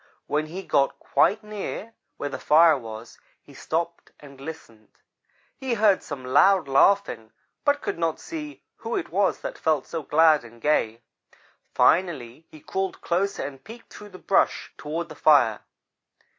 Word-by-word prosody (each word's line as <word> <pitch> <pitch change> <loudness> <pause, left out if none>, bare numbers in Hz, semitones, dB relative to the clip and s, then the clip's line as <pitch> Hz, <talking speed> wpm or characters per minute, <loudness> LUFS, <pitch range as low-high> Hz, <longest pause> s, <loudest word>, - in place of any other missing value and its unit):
When 155 +1 -1
he 185 +5 -7
got 140 -6 +1
quite 215 +2 +1
near 210 +1 -6 0.2
where 145 - -4
the - - -6
fire 160 +2 +5
was, 115 -2 -9 0.2
he - - -17
stopped 170 +1 -4
and 140 -2 -14
listened. 115 -8 -10 0.7
He 260 -3 -2
heard 205 -3 +3
some 135 -4 -8
loud 165 +6 +4
laughing 135 - +2 0.3
but 285 0 +1
could - - -3
not 165 -2 -1
see 305 -2 -8
who 230 +1 -4
it - - -3
was 195 +1 +1
that - - -6
felt 155 -4 +1
so 165 - -5
glad 155 -1 +4
and 120 0 -14
gay. 115 -5 0 0.7
Finally 155 -5 +1
he 155 - -15
crawled 190 +4 -3
closer 190 +3 -1
and 135 -1 -9
peeked 230 +2 -13
through 210 - -11
the 185 - -12
brush 195 - 0
toward 155 +4 -5
the 160 - -10
fire. 140 -9 +4
160 Hz, 155 wpm, -25 LUFS, 140-195 Hz, 0.7 s, fire